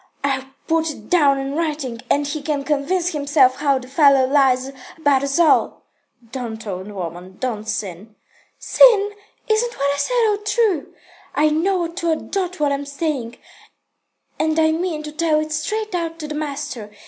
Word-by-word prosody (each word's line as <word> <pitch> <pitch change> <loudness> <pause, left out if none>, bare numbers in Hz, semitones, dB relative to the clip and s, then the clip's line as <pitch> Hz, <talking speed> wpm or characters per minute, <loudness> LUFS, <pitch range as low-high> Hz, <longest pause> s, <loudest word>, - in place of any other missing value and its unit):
I'll 270 -2 0 0.2
put 325 0 +1
it 220 -8 -10
down 290 -6 +4
in 270 0 -3
writing, 295 -7 -2
and 290 0 +2
he 290 +1 -3
can 290 -1 -2
convince 305 +6 0
himself 285 -4 +3
how 280 -2 +2
the 255 -1 -8
fellow 275 -1 +5
lies 265 -1 +2 0.3
about 285 -4 +3
us 275 0 -1
all." 340 -2 +3 0.5
"Don't, 230 -4 -6
old 190 0 -5
woman. 180 0 -7
Don't 220 -4 -3
sin." 205 +1 -5 0.4
"Sin? 425 -5 +5 0.4
Isn't 460 +2 +1
what 280 +1 +1
I - - -4
said 470 +10 +2
all 415 - +1
true? 420 -6 0 0.4
I 305 +1 +4
know 350 +3 +1
to 340 0 -3
a 320 - +3
dot 365 +1 -4
what 295 -1 +2
I'm 280 0 -2
saying, 280 -5 -3 1.0
and 315 0 +1
I 315 0 +4
mean 320 -1 -2
to 300 - -6
tell 310 0 +1
it 310 0 -4
straight 420 +8 -2
out 335 -2 -2
to 305 -2 -6
the 300 - -5
master. 285 -7 -5
295 Hz, 170 wpm, -20 LUFS, 265-330 Hz, 1.0 s, fellow